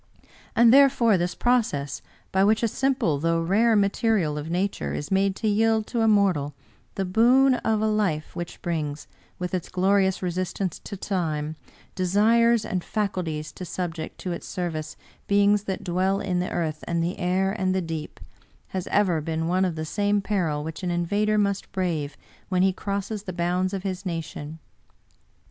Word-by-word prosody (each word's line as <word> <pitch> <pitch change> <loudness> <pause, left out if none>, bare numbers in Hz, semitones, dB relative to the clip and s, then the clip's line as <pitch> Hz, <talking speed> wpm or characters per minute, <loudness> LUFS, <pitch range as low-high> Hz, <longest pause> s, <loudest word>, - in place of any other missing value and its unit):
And 235 0 +6
there 275 0 +8
fore 235 -5 +3
this 175 0 -1
process 215 - 0 0.2
— - - -35
by 190 0 +3
which 215 +3 +3
a - - +4
simple 245 - 0
though 165 +2 +1
rare 210 +7 +3
material 200 -5 +2
of 150 +2 -5
Nature 185 +4 -1
is 145 - -5
made 195 0 +2
to 220 - -2
yield 220 +1 +2
to 235 0 -2
a 225 - +3
mortal 185 -10 +2 0.4
the 195 - -1
boon 245 +8 +5
of 220 -3 0
a - - +2
life 200 -8 -1
which 175 -1 -7
brings, 155 -4 -3 0.3
with 180 0 -4
its 180 -3 -2
glorious 190 +1 +2
resistance 185 0 -2
to 200 - -6
Time, 160 -6 -2 0.4
desires 220 +5 +3
and 180 -2 -2
faculties 175 -7 -2
to - - -9
subject 165 -2 -5
to 185 - -3
its 170 - -5
service 160 -4 -4 0.3
beings 205 0 +3
that 190 -2 -3
dwell 185 +2 +1
in 180 -3 -1
the 180 - -1
earth 155 -3 -3
and 170 -1 0
the 175 +3 -3
air 185 +2 +1
and 190 -3 0
the - - +2
deep 160 -3 -5 0.3
— - - -33
^has 185 -2 -3
ever 180 -6 +2
been 160 +1 -2
one 185 +2 +2
of 175 -3 -2
the 155 0 -4
same 205 +4 +1
peril 175 -8 -1
which 160 +3 -6
an 180 - -2
invader 205 +5 +1
must 200 -1 0
brave 165 -7 -2 0.3
when 185 -1 +2
he 190 0 +3
crosses 200 +2 -3
the 185 -3 -6
bounds 180 +2 0
of 195 -2 -4
his 190 -1 -3
nation. 160 -3 -5
185 Hz, 180 wpm, -25 LUFS, 165-205 Hz, 0.4 s, there